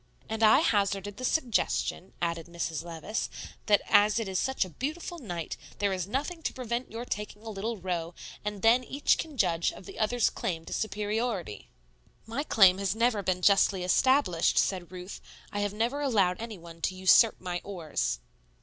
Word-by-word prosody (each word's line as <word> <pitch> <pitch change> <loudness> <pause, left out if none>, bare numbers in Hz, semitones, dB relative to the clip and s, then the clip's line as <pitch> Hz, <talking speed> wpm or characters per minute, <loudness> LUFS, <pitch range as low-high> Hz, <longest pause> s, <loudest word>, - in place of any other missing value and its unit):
"And 220 0 -4
I 220 +6 +7
hazarded 200 - 0
the 255 - -7
suggestion," 245 - 0
added 170 -1 -2
Mrs. 170 -3 -3
Levice, 170 +5 -4 0.4
"that 205 -2 +4
as 210 +2 +5
it 225 -3 -1
is 190 -1 -1
such 265 -6 0
a - - -10
beautiful 315 - -4
night, 175 - -5 0.2
there 200 -1 +1
is 185 -1 -3
nothing 290 - -3
to - - -2
prevent 245 0 -4
your 230 +2 -5
taking 210 -1 -5
a 225 - -6
little 215 +3 -3
row, 175 -2 -3 0.3
and 210 -1 -4
then 235 +3 +5
each 280 +3 +1
can 310 -4 -5
judge 170 -6 +2
of - - -12
the - - -10
other's 225 +1 +2
claim 165 -3 -3
to - - -6
superiority?" 210 - -2 0.6
"My 230 +6 -3
claim 195 -9 +5
has 195 0 0
never 230 -2 +2
been 180 -1 -1
justly 195 -1 +4
established," 185 - +3
said 180 -3 +1
Ruth. 180 +1 -8 0.3
"I 205 - -3
have 205 -1 0
never 235 +7 -1
allowed 205 -9 +2
any 225 -3 -6
one 165 -1 -13
to 185 - -1
usurp 190 +4 +5
my 175 -1 -4
oars." 165 - -2
205 Hz, 180 wpm, -29 LUFS, 180-230 Hz, 0.6 s, I